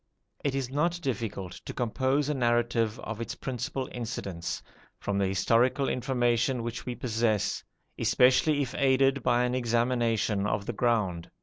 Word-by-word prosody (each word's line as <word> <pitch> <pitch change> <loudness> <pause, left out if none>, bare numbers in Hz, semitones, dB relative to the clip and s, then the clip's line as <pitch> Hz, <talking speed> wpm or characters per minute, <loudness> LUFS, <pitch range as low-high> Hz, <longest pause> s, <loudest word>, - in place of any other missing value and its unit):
It 140 -2 0
is 130 -2 -2
not 170 +5 +1
difficult 110 - -3
to - - -7
compose 130 +4 +1
a 150 - +1
narrative 120 -3 +1
of 110 +1 -5
its 115 - -4
principal 130 +1 -3
incidents, 95 -8 -4 0.3
from 100 -1 -2
the 100 - +2
historical 115 +8 +2
information 125 -1 +1
which 120 +1 -5
we 125 - -2
possess, 110 -4 0 0.4
especially 140 +4 +4
if 130 - -6
aided 135 0 +3
by 120 0 +3
an 125 0 0
examination 115 -4 +1
of 105 -1 -1
the 120 - -3
ground. 105 -7 0
120 Hz, 145 wpm, -28 LUFS, 110-130 Hz, 0.4 s, especially